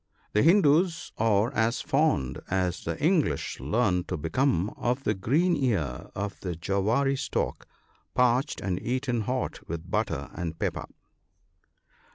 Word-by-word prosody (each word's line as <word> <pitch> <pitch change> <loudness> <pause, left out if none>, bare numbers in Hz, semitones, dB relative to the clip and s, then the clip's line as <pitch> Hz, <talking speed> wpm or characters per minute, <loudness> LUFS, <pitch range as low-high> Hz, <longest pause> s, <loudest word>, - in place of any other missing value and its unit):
— - - -37
The 105 - +4
Hindoos 165 0 +4
are 110 +2 +2
as 115 +2 +1
fond, 135 - +1
as 90 -1 -1
the - - -3
English 155 - +1
learn 90 - +1
to 90 - -3
become, 100 - +1
of 125 +3 -2
the 105 - +1
green 150 - +2
ear 95 - -1
of 100 +1 -4
the 90 -3 -4
jowaree 105 - +1
stalk - - -2 0.5
parched 125 +3 +2
and 95 -2 -2
eaten 125 -1 -1
hot 125 +4 -2
with 85 0 -6
butter - - -1
and 80 -2 -4
pepper. - - -2
115 Hz, 140 wpm, -27 LUFS, 90-135 Hz, 0.5 s, The